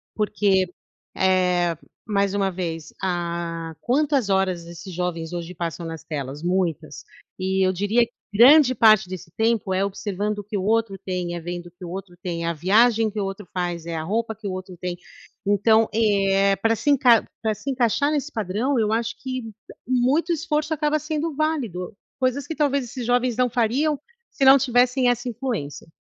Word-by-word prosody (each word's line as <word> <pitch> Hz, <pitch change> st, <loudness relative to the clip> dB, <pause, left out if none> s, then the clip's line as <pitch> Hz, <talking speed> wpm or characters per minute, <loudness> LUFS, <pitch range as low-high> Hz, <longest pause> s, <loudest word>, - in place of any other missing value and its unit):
Porque, 205 Hz, -3 st, +2 dB, 0.5 s
eh, 180 Hz, -2 st, +2 dB, 0.3 s
mais 200 Hz, -2 st, 0 dB
uma 195 Hz, -1 st, +1 dB
vez, 165 Hz, -3 st, -5 dB
ah, 170 Hz, -2 st, -3 dB
quantas 275 Hz, -3 st, +1 dB
horas 190 Hz, -3 st, +1 dB
esses 170 Hz, +2 st, -9 dB
jovens 170 Hz, -2 st, -3 dB
hoje 175 Hz, 0 st, -6 dB
passam 170 Hz, 0 st, -4 dB
nas 165 Hz, -1 st, -7 dB
telas, 145 Hz, 0 st, -5 dB
muitas 170 Hz, -5 st, -2 dB, 0.3 s
e 190 Hz, 0 st, +1 dB
eu 185 Hz, -, +3 dB
diria 210 Hz, +6 st, +2 dB
que 235 Hz, -, -24 dB, 0.2 s
grande 255 Hz, +3 st, +7 dB
parte 215 Hz, -4 st, +5 dB
desse 175 Hz, -3 st, -8 dB
tempo 220 Hz, -4 st, +1 dB
é 190 Hz, +1 st, +1 dB
observando 205 Hz, +1 st, -3 dB
o 205 Hz, -, -6 dB
que 210 Hz, +1 st, -7 dB
o 185 Hz, -, -2 dB
outro 220 Hz, -1 st, +1 dB
tem, 180 Hz, -2 st, -3 dB
é -, -, -4 dB
vendo 175 Hz, +1 st, -6 dB
o 175 Hz, -, -14 dB
que 180 Hz, +1 st, -15 dB
o -, -, -7 dB
outro 185 Hz, 0 st, -7 dB
tem, 170 Hz, -2 st, -3 dB
a 170 Hz, -, 0 dB
viagem 220 Hz, +7 st, +3 dB
que 210 Hz, 0 st, -5 dB
o -, -, 0 dB
outro 195 Hz, -1 st, -6 dB
faz, 175 Hz, -2 st, -3 dB
é 165 Hz, -, -3 dB
a 155 Hz, -, -3 dB
roupa 220 Hz, +5 st, -2 dB
que 215 Hz, -1 st, -7 dB
o -, -, -2 dB
outro 185 Hz, 0 st, -7 dB
tem. 180 Hz, 0 st, -4 dB, 0.5 s
Então 220 Hz, +2 st, +4 dB
é 195 Hz, -2 st, +3 dB
pra 225 Hz, 0 st, +2 dB
se 290 Hz, -, -2 dB
encai 255 Hz, -5 st, +5 dB, 0.2 s
pra 220 Hz, -1 st, 0 dB
se 275 Hz, -, -6 dB
encaixar 265 Hz, +4 st, +1 dB
nesse 300 Hz, 0 st, -2 dB
padrão, 220 Hz, +6 st, -1 dB
eu 215 Hz, -1 st, +1 dB
acho 230 Hz, +1 st, -1 dB
que 255 Hz, -2 st, -4 dB, 0.4 s
muito 260 Hz, +7 st, +2 dB
esforço 310 Hz, -1 st, -1 dB
acaba 300 Hz, 0 st, +1 dB
sendo 305 Hz, 0 st, -3 dB
válido, 245 Hz, -, -2 dB, 0.2 s
coisas 255 Hz, +1 st, 0 dB
que 320 Hz, -, -4 dB
talvez 280 Hz, -3 st, +1 dB
esses 240 Hz, +1 st, -6 dB
jovens 245 Hz, -1 st, +1 dB
não 250 Hz, -1 st, +2 dB
fariam 260 Hz, +6 st, +1 dB, 0.3 s
se 275 Hz, -, -2 dB
não 270 Hz, +1 st, +9 dB
tivessem 250 Hz, 0 st, +3 dB
essa 245 Hz, +1 st, -1 dB
influência. 225 Hz, -, -4 dB
205 Hz, 185 wpm, -23 LUFS, 180-245 Hz, 0.5 s, não